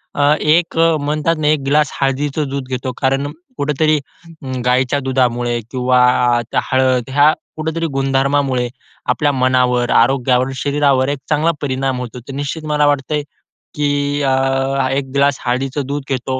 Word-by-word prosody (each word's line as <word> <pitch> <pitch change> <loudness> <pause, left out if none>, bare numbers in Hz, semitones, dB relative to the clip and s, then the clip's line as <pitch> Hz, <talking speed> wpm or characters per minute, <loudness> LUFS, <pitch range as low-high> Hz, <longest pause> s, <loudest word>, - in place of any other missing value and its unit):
अ, 145 +1 +4
एक 165 +2 +2
म्हणतात 155 0 +1
ना, 150 - 0
एक 155 0 +3
ग्लास 150 0 +2
हळदीचं 140 +2 0
दूध 140 -1 -4
घेतो 130 0 -3
कारण 135 +1 +1 0.3
कुठेतरी 150 +2 +1 0.5
अं, 130 -1 -4
गायीच्या 130 +2 +2
दुधामुळे 125 -3 0
किंवा 125 -1 +2 0.4
अ, - - 0
त्या - - +1
हळद, 130 -1 +2
ह्या 145 +3 +5 0.2
कुठेतरी 160 +1 -2
गुणधर्मामुळे 135 -1 +1 0.4
आपल्या 145 +4 +2
मनावर, 125 -2 +1
आरोग्यावर, 130 +1 +2
शरीरावर 140 0 +1
एक 145 -1 -2
चांगला 155 +2 +2
परिणाम 135 -2 -1
होतो. 125 0 -7
तर 130 +3 -10
निश्चित 145 +3 -4
मला 150 0 +3
वाटतंय 145 +1 0 0.5
की 145 0 0
अ, 135 - +2 0.6
एक 135 -1 -2
ग्लास 140 0 +2
हळदीचं 135 +3 -1
दूध 145 0 -3
घेतो, 130 0 -2
135 Hz, 145 wpm, -17 LUFS, 130-145 Hz, 0.6 s, ह्या